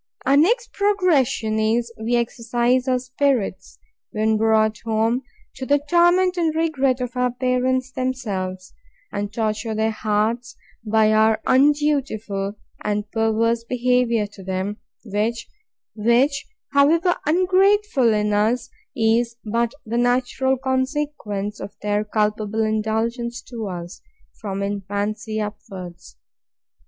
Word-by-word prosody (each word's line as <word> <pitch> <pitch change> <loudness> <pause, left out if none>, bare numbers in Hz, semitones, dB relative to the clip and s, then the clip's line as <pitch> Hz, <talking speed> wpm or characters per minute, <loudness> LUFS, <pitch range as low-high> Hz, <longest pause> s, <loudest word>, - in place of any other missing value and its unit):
Our 275 - +4
next 465 +11 +3
progression 330 - +1
is, 230 +2 0
we 225 +2 -1
exercise 240 +2 0
our 255 -1 +3
spirits, 250 -6 -1 0.3
when 220 +1 +1
brought 220 0 +2
home, 225 +2 0 0.4
to 260 - -5
the 285 - +4
torment 350 +4 +3
and 325 -2 +1
regret 275 -6 +1
of 250 0 -4
our 250 0 +1
parents 255 +1 0
themselves, 200 -9 -3 0.4
and 205 0 -3
torture 220 0 -2
their 220 +1 +1
hearts 220 +4 -1 0.3
by 215 0 +3
our 220 0 +4
undutiful 260 -8 +1 0.3
and 210 0 -2
perverse 225 +1 +1
behaviour 245 -2 +1
to 200 -1 -12
them, 190 +2 -3 0.3
which, 235 - -1 0.3
however 330 +6 +4
ungrateful 370 - +3
in 210 -1 +1
us, 220 +4 +1 0.2
is 230 0 +2
but 230 +2 0
the 230 +2 -1
natural 255 +2 +1
consequence 260 -6 -2
of 200 - -8
their 210 0 +1
culpable 215 0 0
indulgence 225 +2 -1
to 230 -4 -6
us, 175 -1 -7 0.3
from 200 -2 -5
infancy 205 +2 -3
upwards. 190 - -8
230 Hz, 115 wpm, -22 LUFS, 215-260 Hz, 0.4 s, Our